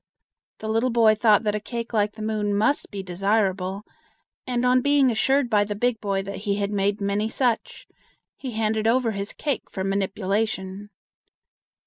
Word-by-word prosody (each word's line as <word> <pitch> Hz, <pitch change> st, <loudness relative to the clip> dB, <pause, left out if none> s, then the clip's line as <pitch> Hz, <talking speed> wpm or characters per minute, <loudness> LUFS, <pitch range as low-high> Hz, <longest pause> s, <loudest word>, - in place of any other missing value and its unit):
The 220 Hz, -, -7 dB
little 225 Hz, +3 st, +1 dB
boy 230 Hz, -2 st, +5 dB
thought 215 Hz, -1 st, +4 dB
that 210 Hz, -1 st, 0 dB
a 210 Hz, -, -1 dB
cake 235 Hz, +2 st, -6 dB
like 210 Hz, -1 st, +1 dB
the 220 Hz, -, -8 dB
moon 210 Hz, -2 st, -1 dB
must 220 Hz, +8 st, +1 dB
be 200 Hz, -2 st, -6 dB
desirable, 195 Hz, +1 st, 0 dB, 0.6 s
and 245 Hz, -1 st, 0 dB
on 250 Hz, 0 st, +4 dB
being 285 Hz, -2 st, +4 dB
assured 265 Hz, +4 st, +2 dB
by 210 Hz, -3 st, +3 dB
the 205 Hz, 0 st, -4 dB
big 235 Hz, +1 st, 0 dB
boy 195 Hz, -2 st, -1 dB
that 200 Hz, +1 st, -6 dB
he 200 Hz, 0 st, -1 dB
had 200 Hz, 0 st, -2 dB
made 200 Hz, 0 st, 0 dB
many 200 Hz, +2 st, 0 dB
such, 255 Hz, -, -1 dB, 0.5 s
he 255 Hz, -3 st, -6 dB
handed 220 Hz, 0 st, 0 dB
over 235 Hz, 0 st, +2 dB
his 200 Hz, 0 st, -4 dB
cake 285 Hz, -5 st, -3 dB
for 190 Hz, -, -4 dB
manipulation. 195 Hz, 0 st, -2 dB
215 Hz, 170 wpm, -24 LUFS, 200-235 Hz, 0.6 s, boy